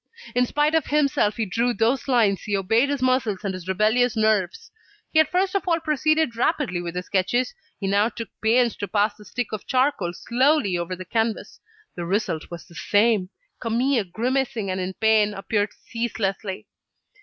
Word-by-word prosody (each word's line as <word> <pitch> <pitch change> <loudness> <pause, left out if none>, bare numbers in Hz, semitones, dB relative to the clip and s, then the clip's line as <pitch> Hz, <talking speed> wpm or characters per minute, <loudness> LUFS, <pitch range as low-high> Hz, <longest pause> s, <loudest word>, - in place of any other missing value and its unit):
In 250 0 +2
spite 295 +3 +1
of 320 - +2
himself, 285 -7 +2
he 225 - 0
drew 235 +5 0
those 235 +5 +1
lines, 225 -7 +3
he 205 -2 -1
obeyed 225 +8 +2
his 285 -3 -1
muscles 255 -6 +1
and 195 -2 -2
his 185 -1 -8
rebellious 220 +5 +2
nerves. 215 - 0 0.4
He 315 - +5
had 315 - +4
first 370 +1 +1
of 395 -1 -1
all 335 -1 +2
proceeded 310 -3 +1
rapidly 230 - 0
with 170 0 -6
his 180 0 -3
sketches; 240 - 0 0.3
he 195 - -4
now 200 +3 +2
took 230 0 -7
pains 235 +2 +3
to 205 - -4
pass 205 +1 +1
the 210 - -15
stick 245 +2 -4
of 215 -1 -6
charcoal 255 -9 +1
slowly 245 - +1
over 175 +1 -3
the 185 +1 -9
canvas. 225 +3 -2 0.3
The 175 - -5
result 175 -4 -1
was 170 0 -8
the 175 - -18
same: 205 +1 +2 0.3
Camille, 235 0 +1
grimacing 240 -2 -1
and 185 - -2
in 185 +1 -4
pain, 215 -2 +3
appeared 205 +1 -1
ceaselessly. 210 -4 -4
225 Hz, 180 wpm, -24 LUFS, 195-255 Hz, 0.4 s, He